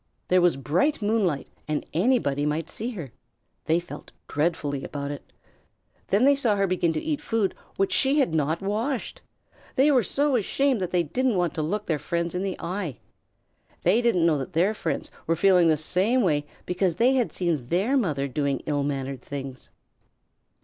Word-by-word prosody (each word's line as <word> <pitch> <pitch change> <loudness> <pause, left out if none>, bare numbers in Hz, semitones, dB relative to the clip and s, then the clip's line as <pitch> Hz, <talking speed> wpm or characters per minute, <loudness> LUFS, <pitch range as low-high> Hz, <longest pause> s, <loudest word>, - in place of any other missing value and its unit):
There 185 0 +5
was 175 -5 +3
bright 180 - 0
moonlight 205 -9 +1 0.2
and 155 -1 -2
anybody 170 - +2
might 150 +2 -2
see 230 +3 -4
her. 160 - -7 0.5
They 160 +2 +3
felt 175 - -10 0.2
dreadfully 145 -3 -1
about 140 0 -4
it. 145 - -9 0.8
Then 200 +5 +2
they 285 - +6
saw 245 -7 +1
her 200 -1 +2
begin 180 -3 +1
to 155 - -1
eat 305 -2 -2
food 225 -4 0 0.2
which 195 - +1
she 275 +2 +3
had 265 - +2
not 160 +3 0
washed. 225 +6 -2 0.5
They 280 +3 +5
were 260 -3 +5
so 280 +7 +1
ashamed 255 +2 +1
that 180 - -1
they 180 -1 +2
didn't 250 - 0
want 175 -2 +1
to 155 - -2
look 200 +7 -2
their 155 -3 -1
friends 170 +1 -2
in 180 - -2
the 195 -1 -2
eye. 175 - -4 0.9
They 200 +7 +4
didn't 225 -9 +2
know 155 -4 +3
that 135 - -6
their 180 +7 +2
friends - - -3 0.2
were 165 - +2
feeling 180 0 +5
in - - +5
the 155 - +3
same 195 - +2
way 145 -5 +1 0.2
because 180 -1 0
they 245 +7 +4
had 255 -3 +1
seen 165 -9 -1
their 195 - +1
mother 150 - 0
doing 140 0 -1
ill 145 -2 0
mannered 135 -2 -3
things. 135 -2 -7
175 Hz, 185 wpm, -25 LUFS, 150-220 Hz, 0.9 s, they